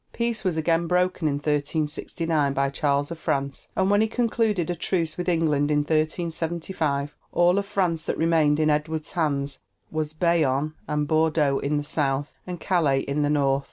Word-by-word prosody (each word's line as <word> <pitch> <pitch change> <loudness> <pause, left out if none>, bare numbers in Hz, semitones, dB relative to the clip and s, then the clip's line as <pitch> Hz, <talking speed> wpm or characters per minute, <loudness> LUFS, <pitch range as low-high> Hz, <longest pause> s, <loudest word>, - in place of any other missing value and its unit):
Peace 235 -1 -1
was 180 -5 0
again 165 +1 +1
broken 180 -1 +1
in 145 - +1
1369 150 +1 -1
by 140 0 0
Charles 140 +1 0
of 165 - -6
France, 140 -2 -2
and 190 +1 +2
when 205 +1 +4
he 220 - +3
concluded 220 -6 0
a - - 0
truce 165 -2 -1
with 180 0 -2
England 155 -4 +2
in 150 -1 +3
1375 160 -1 -1 0.2
all 175 +2 +3
of 200 - -4
France 170 -5 0
that - - -1
remained 160 -2 +3
in 155 -1 +3
Edward's 155 +1 -1
hands 140 -5 -1 0.3
was 155 -1 -2
Bayonne 155 -3 +1
and 150 -1 -1
Bordeaux 155 -3 +2
in 150 +1 -1
the 145 - -1
south, 145 -1 -1
and 180 -1 -5
Calais 150 -8 +2
in 140 +2 -2
the 145 - +1
north. 140 -2 +2
155 Hz, 175 wpm, -25 LUFS, 145-170 Hz, 0.3 s, when